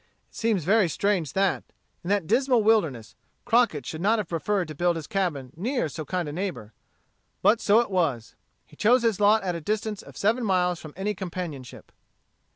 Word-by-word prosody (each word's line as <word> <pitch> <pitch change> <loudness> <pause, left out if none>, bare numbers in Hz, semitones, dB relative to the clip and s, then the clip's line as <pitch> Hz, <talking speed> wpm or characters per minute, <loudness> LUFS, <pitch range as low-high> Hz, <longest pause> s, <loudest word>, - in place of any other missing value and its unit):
It - - -23
seems 220 -6 0
very 200 +1 +3
strange 185 -4 0
that, 195 -2 +1 0.4
in 175 - -5
that 200 -4 +1
dismal 245 - +2
wilderness, 150 - +1 0.3
Crockett 230 - +2
should 155 +4 -6
not 215 +4 +3
have 210 -5 -3
preferred 180 +2 -1
to - - -5
build 175 +3 +1
his 160 -2 -5
cabin 150 -10 -2
near 240 - -1
so 155 +2 -6
kind 175 +1 -2
a 145 - -5
neighbor. 170 - -5 0.7
But 220 +2 +4
so 210 +3 +5
it 235 - -5
was. 150 -11 -1 0.3
He - - -19
chose 240 +3 +3
his 225 -4 +1
lot 210 +1 +4
at 180 -2 -1
a 170 - -5
distance 215 +3 -2
of - - -14
seven 230 +5 +1
miles 180 -4 +1
from 155 -2 -11
any 205 +2 -1
companionship. 175 -9 -7
190 Hz, 190 wpm, -26 LUFS, 160-215 Hz, 0.7 s, so